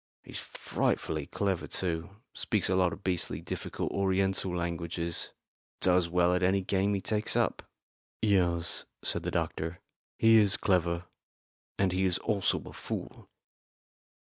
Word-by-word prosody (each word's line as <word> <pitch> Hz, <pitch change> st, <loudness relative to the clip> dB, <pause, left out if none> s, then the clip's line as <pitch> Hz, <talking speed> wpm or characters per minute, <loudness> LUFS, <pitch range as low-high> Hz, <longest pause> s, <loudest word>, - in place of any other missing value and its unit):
He's -, -, -6 dB
frightfully -, -, -2 dB
clever 95 Hz, -6 st, -1 dB
too 85 Hz, -2 st, -2 dB, 0.2 s
speaks 105 Hz, -5 st, +1 dB
a 95 Hz, -, +3 dB
lot 90 Hz, -2 st, +3 dB
of 95 Hz, -, -8 dB
beastly 90 Hz, -2 st, 0 dB
difficult -, -, -4 dB
Oriental 95 Hz, -1 st, +1 dB
languages 85 Hz, 0 st, -2 dB, 0.5 s
does 90 Hz, -2 st, +4 dB
well 90 Hz, 0 st, +3 dB
at 90 Hz, -, +1 dB
any 95 Hz, +2 st, +3 dB
game 100 Hz, +2 st, +1 dB
he 100 Hz, -, -2 dB
takes 105 Hz, +1 st, +2 dB
up." -, -, +1 dB, 0.6 s
"Yes," 90 Hz, -5 st, +1 dB, 0.2 s
said -, -, -1 dB
the -, -, -2 dB
doctor, 80 Hz, +2 st, -2 dB, 0.4 s
"he 115 Hz, 0 st, +6 dB
is 105 Hz, -3 st, +5 dB
clever; 85 Hz, -2 st, +1 dB, 0.7 s
and 95 Hz, -2 st, +2 dB
he 95 Hz, +1 st, +1 dB
is 90 Hz, -1 st, +2 dB
also 100 Hz, -2 st, +1 dB
a -, -, -9 dB
fool." -, -, -6 dB
90 Hz, 140 wpm, -30 LUFS, 85-100 Hz, 0.7 s, he